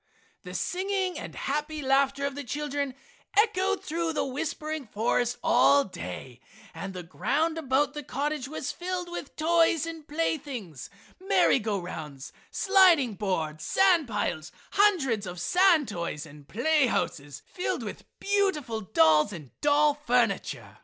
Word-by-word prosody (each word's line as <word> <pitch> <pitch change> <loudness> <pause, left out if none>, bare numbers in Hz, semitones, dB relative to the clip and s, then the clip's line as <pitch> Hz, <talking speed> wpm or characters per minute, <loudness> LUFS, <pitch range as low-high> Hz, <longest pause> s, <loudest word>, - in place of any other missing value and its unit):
The - - -9
singing 380 0 -1
and - - -8
happy 300 +1 -3
laughter 275 +1 +2
of 280 - -2
the 285 +1 -6
children 285 0 -3 0.4
echoed 405 -2 +2
through 330 +1 -2
the - - 0
whispering 305 +1 -4
forest 235 +3 0
all 285 -3 +5
day, 125 - -8 0.3
and 195 -1 -6
the 180 - -5
ground 315 - -1
about 285 0 +1
the 295 - -5
cottage 280 0 -3
was 285 -1 -4
filled 360 0 -4
with 345 - -7
toys 330 0 +3
and 325 -2 -8
playthings, 275 - -3 0.3
merry 380 -7 +3
go 210 -2 -1
rounds, 150 -6 -7 0.2
sliding 365 - +4
boards, 160 -7 -2
sand 360 - +3
piles, 190 -7 -2 0.2
hundreds 270 - +2
of 180 0 -6
sand 345 - +4
toys, 170 -6 -4
and 145 -2 -14
play 285 +5 +2
houses 145 - -3
filled 360 - -3
with - - -7
beautiful 385 - 0
dolls 160 -2 +4
and 155 -9 -9
doll 295 0 +4
furniture. 250 -4 -1
280 Hz, 140 wpm, -27 LUFS, 205-330 Hz, 0.4 s, all